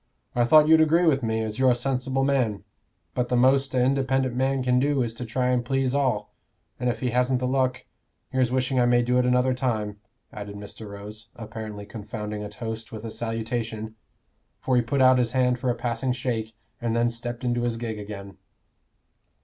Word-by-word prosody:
"I 120 -1 +3
thought 155 +5 +7
you'd 160 0 +7
agree 165 +3 +4
with 140 -4 +3
me, 110 -1 -1
as 110 +2 -4
you're 130 -1 +5
a 125 - +4
sensible 135 +1 -1
man. 130 -7 +1 0.5
But 125 -1 -1
the 125 - +1
most 135 +2 +3
a 125 - +3
independent 135 -1 +1
man 130 +1 +1
can 125 0 +3
do 140 -1 +2
is 115 -1 -3
to 120 +2 -6
try 125 +2 0
and 125 -1 +2
please 135 +1 0
all; 140 -3 0 0.5
and 125 0 0
if 120 - -3
he 125 -2 0
hasn't 125 +1 +2
the 125 - -1
luck 130 0 0 0.5
here's 130 -2 +1
wishing 130 0 +1
I 120 - +4
may 120 0 +4
do 125 +1 +2
it 125 - +2
another 125 +1 +3
time," 110 -5 -2 0.4
added 100 -1 -7
Mr. 105 +1 -9
Rose, 100 +1 -9
apparently 110 -2 -7
confounding 105 0 -6
a 105 - -5
toast 110 0 -6
with 110 -1 -7
a 115 - -4
salutation, 115 -1 -3 0.7
for 130 - 0
he 125 - +5
put 130 +4 0
out 130 0 +6
his 120 -1 0
hand 125 -1 +2
for 130 0 -1
a 120 - +1
passing 120 +2 -1
shake, 115 -3 -3 0.3
and 115 -1 -1
then 120 0 +2
stepped 120 +1 -6
into 120 -1 0
his 120 -1 -1
gig 115 -2 -4
again. 100 -2 -8
120 Hz, 205 wpm, -25 LUFS, 110-130 Hz, 0.7 s, thought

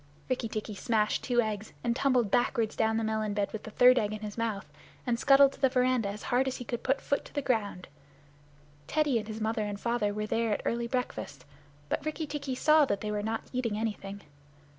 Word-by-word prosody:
Rikki 250 -3 -1
tikki 215 0 -4
smashed 215 +1 0
two 240 -2 +3
eggs, 215 -1 -4
and 235 -1 +1
tumbled 250 -6 +2
backward 235 -2 +2
down 220 0 0
the 225 - 0
melon 220 -1 -1
bed 205 -1 -1
with 220 - -4
the - - -8
third 250 +3 +6
egg 210 0 -1
in 215 - -6
his 210 -1 -6
mouth, 225 -4 -2 0.4
and 240 -2 0
scuttled 275 0 +6
to - - -16
the 265 - +5
veranda 250 -4 +2
as 205 +1 -7
hard 255 +2 +1
as 260 - -2
he 245 - -7
could 240 0 -3
put 270 +1 +1
foot 280 - -1
to - - -14
the - - +1
ground. 210 -8 -1 1.0
Teddy 295 - +2
and 210 - -7
his 220 0 -5
mother 220 0 0
and 205 -1 -4
father 235 -3 0
were 210 +1 -3
there 225 0 0
at - - -3
early 235 0 0
breakfast, 230 - -4 0.4
but - - -2
Rikki 310 +1 -3
tikki 285 -3 -4
saw 305 +3 +5
that 200 -6 -1
they 210 - -3
were 210 0 -1
not 220 +1 -2
eating 235 -4 -1
anything. 205 -2 -4
225 Hz, 225 wpm, -30 LUFS, 210-255 Hz, 1.0 s, third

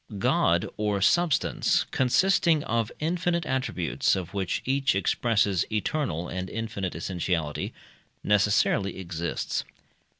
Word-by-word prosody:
God, 95 - +2
or 105 -1 0
substance, 170 - +2
consisting 160 +3 +3
of 115 -1 -1
infinite 170 +1 0
attributes, 130 -10 0
of 95 -1 -5
which 95 -3 -2
each 135 -3 +1
expresses 100 -1 +1
eternal 105 - -1
and 90 +1 -4
infinite 105 -6 -4
essentiality, 85 -3 -2 0.5
necessarily 100 -1 +2
exists. 85 -2 -3
105 Hz, 100 wpm, -27 LUFS, 95-135 Hz, 0.5 s, consisting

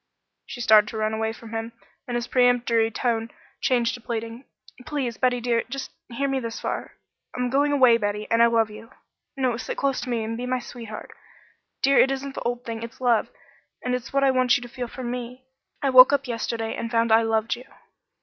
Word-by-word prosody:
She 245 - -7
started 215 -2 +6
to 220 - -6
run 215 0 0
away 220 0 -1
from 225 0 -11
him, 225 +1 -4 0.3
and 245 - -3
his 240 0 -1
peremptory 245 -3 +3
tone 225 0 -1 0.3
changed 240 -2 +2
to 245 - -8
pleading. 230 +2 -5 0.4
"Please, 265 -6 -3
Betty, 250 -1 +2
dear! 235 -1 +1
just 275 +1 -5 0.2
hear 265 +4 -2
me 270 -1 0
this 230 -2 -5
far. - - -4 0.4
I'm 250 -1 -1
going 285 +2 +2
away, 255 -5 +6
Betty, 210 -1 -2
and 230 0 +4
I 235 - +7
love 225 -2 +2
you. 225 +2 -11 0.5
No, 255 -3 +1
sit - - -5
close 275 -2 -1
and 230 -2 -2
be 250 +1 -4
my 255 0 0
sweetheart. 230 -3 -8 0.7
Dear, 275 +1 +5
it 265 - +6
isn't 270 0 -3
the - - -6
old 245 0 -2
thing. 225 -1 -5
It's 230 0 -8
love, 240 -4 +2 0.5
and 250 - -1
it's 250 -1 -3
what 275 0 +2
I 270 - +5
want 255 0 +3
you 245 - -8
to - - -8
feel 245 0 -5
for 255 +2 -8
me. 250 +1 -5 0.4
I 275 - +2
woke 255 +1 +9
up 280 -1 +1
yesterday, 230 -1 -3
and 230 - -4
found 230 -1 +1
I 225 +1 +6
loved 225 0 0
you." 250 +2 -12
240 Hz, 210 wpm, -24 LUFS, 230-255 Hz, 0.7 s, woke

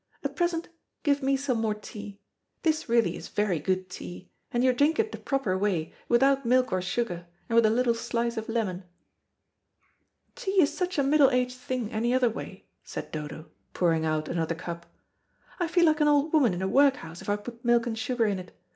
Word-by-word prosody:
At - - -3
present 345 -1 0 0.4
give 285 -2 +2
me 270 0 +2
some 265 -4 -1
more 215 -2 0
tea. 205 -1 -9 0.4
This 315 -5 0
really 235 0 +3
is - - -8
very 205 -6 0
good 185 +4 -1
tea, 180 0 -9 0.2
and 240 +1 +1
you 255 -1 +4
drink 290 +5 +2
it 445 -1 +1
the - - -7
proper 270 -9 -1
way, 185 -5 -1 0.2
without 270 +3 +4
milk 255 +1 +3
or 185 - +1
sugar, 180 -2 -2 0.2
and 230 - -1
with 230 -1 +6
a - - +3
little 235 +1 +2
slice 235 0 -2
of 220 0 -5
lemon." 200 -6 -2 1.5
"Tea 395 -6 0
is 285 - 0
such 365 -1 -2
a 280 - +3
middle 280 0 +5
aged 250 -1 0
thing 250 -3 -3
any 235 +3 +1
other 250 -2 +3
way," - - -8 0.2
said - - -7
Dodo, 155 +1 -7 0.2
pouring 165 -3 +2
out 155 -1 0
another 165 -1 -1
cup. 170 0 -7 0.7
"I 350 - +1
feel 345 +1 +3
like 310 -1 +3
an 300 - +5
old 295 +1 +3
woman 260 - +4
in 180 - -3
a - - +1
workhouse 260 - +2
if - - -7
I 205 - +3
put 230 +3 -9
milk 240 0 +3
and 235 -2 -2
sugar 240 0 0
in 200 -3 0
it. 180 - -12
235 Hz, 205 wpm, -27 LUFS, 185-275 Hz, 1.5 s, with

